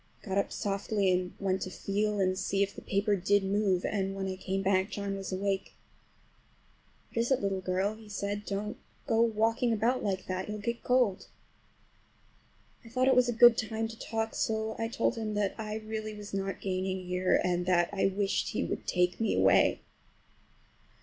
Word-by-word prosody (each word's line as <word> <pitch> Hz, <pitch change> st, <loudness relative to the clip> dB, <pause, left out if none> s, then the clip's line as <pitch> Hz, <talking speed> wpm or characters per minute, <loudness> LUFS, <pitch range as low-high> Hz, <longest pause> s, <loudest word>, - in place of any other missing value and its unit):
I -, -, -9 dB
got 190 Hz, +1 st, +2 dB
up -, -, -1 dB
softly 200 Hz, -1 st, 0 dB
and 180 Hz, 0 st, 0 dB
went 190 Hz, -1 st, 0 dB
to -, -, -3 dB
feel 205 Hz, +3 st, -1 dB
and 185 Hz, -1 st, +2 dB
see 195 Hz, +1 st, +1 dB
if 200 Hz, 0 st, -3 dB
the -, -, -8 dB
paper 200 Hz, +1 st, +1 dB
did 200 Hz, +2 st, +2 dB
move, 195 Hz, -2 st, +1 dB
and 195 Hz, -2 st, -1 dB
when 195 Hz, 0 st, -3 dB
I 190 Hz, -, -3 dB
came 195 Hz, +1 st, -3 dB
back 190 Hz, 0 st, +2 dB
John 200 Hz, -1 st, -3 dB
was 195 Hz, 0 st, -5 dB
awake. 195 Hz, +1 st, -2 dB, 1.4 s
"What -, -, -2 dB
is 235 Hz, -, +1 dB
it, 265 Hz, -, +4 dB
little 195 Hz, -1 st, -1 dB
girl?" 185 Hz, +3 st, 0 dB
he 215 Hz, -1 st, -13 dB
said. 205 Hz, 0 st, -3 dB
"Don't 205 Hz, +1 st, -4 dB, 0.3 s
go 225 Hz, 0 st, +2 dB
walking 230 Hz, +1 st, +2 dB
about 230 Hz, +4 st, +1 dB
like 190 Hz, -3 st, -1 dB
that—you'll 190 Hz, +3 st, -3 dB
get 235 Hz, +3 st, -3 dB
cold." 245 Hz, -6 st, +2 dB, 1.6 s
I 230 Hz, -, -13 dB
thought 255 Hz, +2 st, +1 dB
it 260 Hz, -, +5 dB
was 250 Hz, -1 st, +4 dB
a -, -, +3 dB
good 240 Hz, 0 st, +7 dB
time 220 Hz, 0 st, -2 dB
to 225 Hz, -, -10 dB
talk, 225 Hz, 0 st, -2 dB
so 220 Hz, 0 st, -1 dB
I 225 Hz, -, 0 dB
told 235 Hz, 0 st, 0 dB
him 215 Hz, -2 st, -3 dB
that 205 Hz, -2 st, 0 dB
I 215 Hz, -1 st, -4 dB
really 215 Hz, 0 st, -5 dB
was 210 Hz, -1 st, -9 dB
not 195 Hz, 0 st, -3 dB
gaining 185 Hz, -1 st, -2 dB
here, 180 Hz, +1 st, +2 dB
and 180 Hz, 0 st, 0 dB
that 175 Hz, -2 st, +3 dB
I 195 Hz, -, +2 dB
wished 195 Hz, +1 st, 0 dB
he -, -, 0 dB
would -, -, -4 dB
take 180 Hz, 0 st, +1 dB
me 225 Hz, -, +1 dB
away. -, -, +4 dB
200 Hz, 190 wpm, -30 LUFS, 190-220 Hz, 1.6 s, good